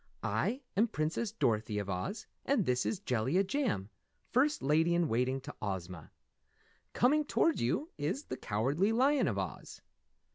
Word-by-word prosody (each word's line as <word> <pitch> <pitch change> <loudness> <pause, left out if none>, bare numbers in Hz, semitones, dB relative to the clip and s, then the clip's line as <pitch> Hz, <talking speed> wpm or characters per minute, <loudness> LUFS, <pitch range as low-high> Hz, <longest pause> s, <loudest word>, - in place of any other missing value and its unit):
I 260 +4 0
am 215 +5 +4
Princess 170 +3 -1
Dorothy 110 -2 0
of 100 -1 -2
Oz 95 - -3 0.2
and 265 -9 +2
this 125 0 +1
is 205 - -1
Jellia 135 - +1
Jam, 195 - -1 0.4
First 290 +5 +2
Lady 160 +4 +3
in 170 -1 +2
Waiting 125 +2 +1
to - - -8
Ozma. 90 -5 -5 0.8
Coming 300 +5 +3
toward 320 +1 +2
you 290 - -1
is 180 - -1
the - - -5
Cowardly 140 - +1
Lion 265 +4 +3
of 105 -6 -1
Oz." 95 -4 -5
155 Hz, 150 wpm, -32 LUFS, -, 0.8 s, am